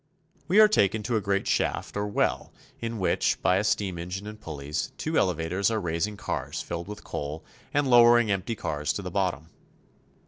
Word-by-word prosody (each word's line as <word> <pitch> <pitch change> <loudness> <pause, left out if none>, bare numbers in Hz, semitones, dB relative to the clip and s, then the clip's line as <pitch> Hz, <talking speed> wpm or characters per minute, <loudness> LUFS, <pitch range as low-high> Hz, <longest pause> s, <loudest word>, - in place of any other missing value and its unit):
We 190 +5 +4
are 215 - +9
taken 105 - +2
to 115 +2 -1
a 110 - +1
great 100 0 0
shaft - - -1
or 105 0 -1
well 100 - 0 0.3
in 115 0 -4
which, 95 - +1
by 90 - +4
a 100 - +1
steam 100 -4 0
engine 90 +4 -5
and 105 0 -9
pulleys, 75 - -4
two 160 +1 -3
elevators 90 - +1
are 110 -1 0
raising 85 +3 -2
cars 105 - -4
filled 85 +1 -5
with 105 0 -8
coal 75 +2 -5 0.3
and 145 -1 +1
lowering 120 -2 +6
empty 100 +4 -1
cars 75 -7 -2
to - - -5
the - - -5
bottom. 80 +5 -1
100 Hz, 185 wpm, -27 LUFS, 85-110 Hz, 0.3 s, are